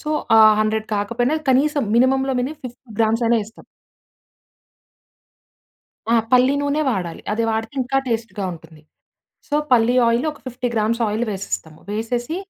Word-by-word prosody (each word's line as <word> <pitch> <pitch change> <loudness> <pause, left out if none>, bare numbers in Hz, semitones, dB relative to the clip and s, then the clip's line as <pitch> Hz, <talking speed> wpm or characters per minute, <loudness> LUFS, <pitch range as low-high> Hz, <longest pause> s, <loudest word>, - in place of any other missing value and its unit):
So, 305 - -5 0.3
ఆ - - +7 0.2
100 215 0 0
కాకపోయినా 235 +8 0
కనీసం 285 +3 +2
మినిమమ్‌లో 265 +2 +2
మినిమం 290 +5 -4
50 245 0 -10
గ్రామ్స్ 225 +1 +2
అయినా 235 0 +3
వేస్తాం. 220 +2 -14 2.5
ఆ - - +5 0.2
పల్లి 255 +2 +5
నూనే 285 +2 0
వాడాలి. 180 -7 -3
అది 230 +2 0
వాడితే 225 +3 -3
ఇంకా 255 +2 -1
టేస్ట్‌గా 225 -4 -3
ఉంటుంది. 160 -1 -15 0.7
సో, 290 - 0 0.2
పల్లి 240 +1 +4
ఆయిల్ 235 +5 +1
ఒక 295 - -15
50 250 0 -3
గ్రామ్స్ 225 +2 0
ఆయిల్ 215 +3 -1
వేసేస్తాము. 185 -5 -5
వేసేసి 240 +7 -3
235 Hz, 140 wpm, -20 LUFS, 215-260 Hz, 2.5 s, ఆ